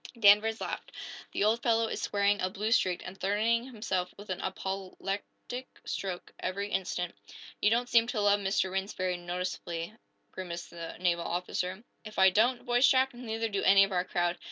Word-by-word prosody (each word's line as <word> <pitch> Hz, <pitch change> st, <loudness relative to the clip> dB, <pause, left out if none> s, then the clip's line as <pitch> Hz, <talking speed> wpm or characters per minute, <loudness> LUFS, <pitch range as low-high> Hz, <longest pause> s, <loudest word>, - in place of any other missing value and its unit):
Danvers 215 Hz, +1 st, +6 dB
laughed. -, -, -5 dB, 0.4 s
"The -, -, 0 dB
old 220 Hz, +3 st, +3 dB
fellow 230 Hz, -1 st, +3 dB
is -, -, -4 dB
swearing 205 Hz, 0 st, +1 dB
a 185 Hz, -, +1 dB
blue 210 Hz, +4 st, -2 dB
streak, 185 Hz, -6 st, +2 dB
and 185 Hz, -, -7 dB
threatening 220 Hz, +4 st, +2 dB
himself 210 Hz, -7 st, -2 dB
with 205 Hz, -1 st, -8 dB
an 185 Hz, -, -3 dB
apoplectic 195 Hz, +6 st, -5 dB, 0.2 s
stroke 185 Hz, -3 st, -4 dB
every 200 Hz, +2 st, -2 dB
instant." 180 Hz, -2 st, -2 dB, 0.5 s
"You 210 Hz, -, +5 dB
don't 240 Hz, +2 st, +2 dB
seem 230 Hz, -1 st, +4 dB
to 240 Hz, -3 st, -2 dB
love 205 Hz, 0 st, +4 dB
Mr. 190 Hz, -1 st, 0 dB
Rhinds 195 Hz, +2 st, -2 dB
very 185 Hz, -1 st, -1 dB
noticeably," 175 Hz, -1 st, -4 dB, 0.4 s
grimaced 175 Hz, -2 st, -6 dB
the 170 Hz, -1 st, -7 dB
naval 170 Hz, -2 st, +1 dB
officer. 180 Hz, +3 st, -2 dB, 0.2 s
"If 215 Hz, -1 st, -10 dB
I 190 Hz, 0 st, +7 dB
don't," 240 Hz, +5 st, +3 dB
voiced 245 Hz, +2 st, +4 dB
Jack, 265 Hz, 0 st, +3 dB
"neither 225 Hz, -2 st, -3 dB
do 200 Hz, -2 st, -2 dB
any 195 Hz, 0 st, +7 dB
of 195 Hz, -, -1 dB
our 180 Hz, -1 st, +1 dB
crowd. 175 Hz, -1 st, -1 dB
195 Hz, 180 wpm, -30 LUFS, 185-225 Hz, 0.5 s, I